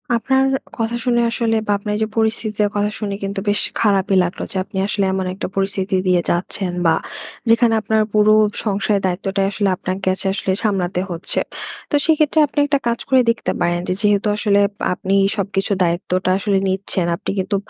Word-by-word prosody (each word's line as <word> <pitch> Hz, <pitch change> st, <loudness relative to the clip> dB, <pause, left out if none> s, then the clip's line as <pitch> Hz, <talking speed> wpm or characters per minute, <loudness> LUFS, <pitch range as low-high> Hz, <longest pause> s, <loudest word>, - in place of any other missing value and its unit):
আপনার 265 Hz, +3 st, +2 dB, 0.3 s
কথা 230 Hz, 0 st, -1 dB
শুনে 240 Hz, -1 st, +2 dB
আসলে 230 Hz, -1 st, 0 dB
বা, -, -, +1 dB
আপনার 210 Hz, +1 st, -4 dB
এইযে 220 Hz, 0 st, 0 dB
পরিস্থিতিটার 220 Hz, -2 st, 0 dB
কথা 205 Hz, 0 st, +1 dB
শুনে 200 Hz, -2 st, -3 dB
কিন্তু 195 Hz, 0 st, -3 dB
বেশ 205 Hz, -, +2 dB, 0.2 s
খারাপই 200 Hz, -2 st, +2 dB
লাগলো 175 Hz, 0 st, -4 dB
যে, -, -, -10 dB
আপনি 190 Hz, -, -9 dB
আসলে 200 Hz, -1 st, 0 dB
এমন 190 Hz, -1 st, -1 dB
একটা 195 Hz, -, -4 dB
পরিস্থিতি 195 Hz, 0 st, -1 dB
দিয়ে 180 Hz, -1 st, +3 dB
যাচ্ছেন 180 Hz, +1 st, -1 dB
বা, 165 Hz, -, +5 dB, 0.5 s
যেখানে 230 Hz, 0 st, +4 dB
আপনার 220 Hz, 0 st, +1 dB
পুরো 215 Hz, 0 st, +5 dB, 0.3 s
সংসারের 205 Hz, -1 st, +1 dB
দায়িত্বটাই 195 Hz, +2 st, -1 dB
আসলে 205 Hz, -1 st, 0 dB
আপনাকে 185 Hz, +2 st, -4 dB
আচে 190 Hz, -, -4 dB
আসলে 195 Hz, -1 st, -2 dB
সামলাতে 185 Hz, -4 st, 0 dB
হচ্ছে। 170 Hz, -1 st, -2 dB, 0.5 s
তো -, -, 0 dB
সেক্ষেত্রে, 310 Hz, -1 st, +3 dB
আপনি 290 Hz, -, -3 dB
একটা 285 Hz, -1 st, +1 dB
কাজ 235 Hz, 0 st, 0 dB
করে 260 Hz, -1 st, +5 dB
দেখতে 230 Hz, -, 0 dB
পারেন 175 Hz, 0 st, +1 dB
যে, -, -, +1 dB
যেহেতু 205 Hz, 0 st, +2 dB
আসলে 205 Hz, -1 st, +2 dB, 0.3 s
আপনি 190 Hz, +2 st, -1 dB, 0.2 s
সবকিছুর 195 Hz, -1 st, -1 dB
দায়িত্বটা 180 Hz, +2 st, 0 dB
আসলে 200 Hz, 0 st, 0 dB
নিচ্ছেন, 190 Hz, -1 st, -1 dB
আপনি -, -, -4 dB
কিন্তু 190 Hz, +2 st, -1 dB
200 Hz, 175 wpm, -19 LUFS, 190-220 Hz, 0.5 s, বা